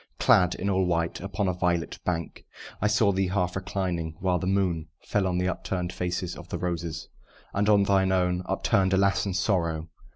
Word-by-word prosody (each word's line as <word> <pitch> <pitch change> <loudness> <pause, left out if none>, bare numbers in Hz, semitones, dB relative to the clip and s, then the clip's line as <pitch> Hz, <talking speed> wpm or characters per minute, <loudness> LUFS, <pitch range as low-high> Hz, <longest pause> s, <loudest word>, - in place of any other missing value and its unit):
Clad 90 -1 +4
all 95 0 0
in 90 - +1
white, 85 -1 0
upon 100 +2 -2
a 90 - +1
violet 90 -1 -1
bank 85 -2 -3 0.4
I 105 - +3
saw 105 -1 +3
thee 95 0 0
half 90 -1 -1
reclining; 90 -4 -2
while 90 -1 +1
the 95 - -3
moon 90 -5 0 0.2
Fell 100 -2 0
on 90 -1 0
the 90 0 +1
upturn'd 90 -1 -3
faces 90 0 -3
of 85 - -11
the - - -3
roses, 85 -3 -3 0.5
And 100 +1 +1
on 100 -1 +5
thine 95 -1 +3
own, 90 -1 +1
upturn'd 95 -1 +1
alas, 100 +1 +2
in 95 - -2
sorrow! 85 -4 0
90 Hz, 190 wpm, -27 LUFS, 85-95 Hz, 0.5 s, on